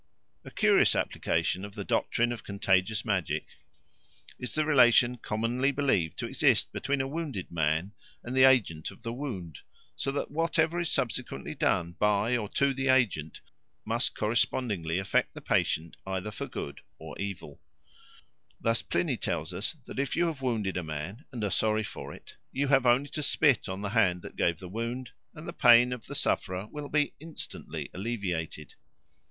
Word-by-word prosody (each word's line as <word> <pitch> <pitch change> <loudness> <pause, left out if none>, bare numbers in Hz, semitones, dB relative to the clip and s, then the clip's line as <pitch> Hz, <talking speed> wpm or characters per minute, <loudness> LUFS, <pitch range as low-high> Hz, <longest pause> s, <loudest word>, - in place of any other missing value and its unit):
A - - -9
curious - - +4
application 95 - 0
of 100 0 -8
the 100 - -4
doctrine 120 +4 +1
of 120 -3 -5
contagious 100 +2 +1
magic 100 -7 0 0.9
is 125 - -6
the 155 0 +2
relation 125 -4 +5
commonly 120 +5 0
believed 135 - +1
to - - -2
exist - - +2
between 140 -1 0
a 135 - -2
wounded 140 - -4
man 80 +3 0 0.3
and 125 +2 -5
the 130 - +6
agent 105 -12 +3
of - - -14
the 115 - -3
wound, 105 - -5 0.4
so 135 - -1
that 140 - -3
whatever 165 +1 +1
is 170 -2 0
subsequently 125 -4 -1
done 85 0 +1
by 105 +3 +2
or 105 -4 -2
to 140 0 +2
the 135 0 -2
agent 115 - +2 0.4
must - - 0
correspondingly 105 -6 0
affect 95 0 0
the - - -6
patient 80 +1 0
either 95 +2 -3
for - - -5
good 70 - -6 0.2
or 80 -2 -9
evil. 95 -7 -6 1.0
Thus 115 0 +2
Pliny 145 -8 0
tells 85 -3 -2
us 100 - -1
that - - -6
if 140 -2 -1
you 175 - +3
have 160 -5 -3
wounded 110 -7 -1
a 90 - -2
man 80 - -6
and 120 -4 -5
are 100 - 0
sorry 110 0 +2
for - - -7
it, - - -13
you 140 +1 -1
have 135 -2 +4
only 130 +4 +4
to 150 - -3
spit 145 -6 +3
on 95 +1 -4
the 100 - -2
hand 95 -5 +2
that - - -9
gave 85 -2 +1
the 90 - -9
wound, 115 +5 -4 0.2
and 155 - -9
the 170 - -5
pain 120 -4 +6
of 125 -3 -8
the - - -6
sufferer 95 +2 -1
will 150 -1 -6
be 150 -1 +1
instantly 160 +1 -7
alleviated. 90 - -4
115 Hz, 175 wpm, -29 LUFS, 95-135 Hz, 1.0 s, the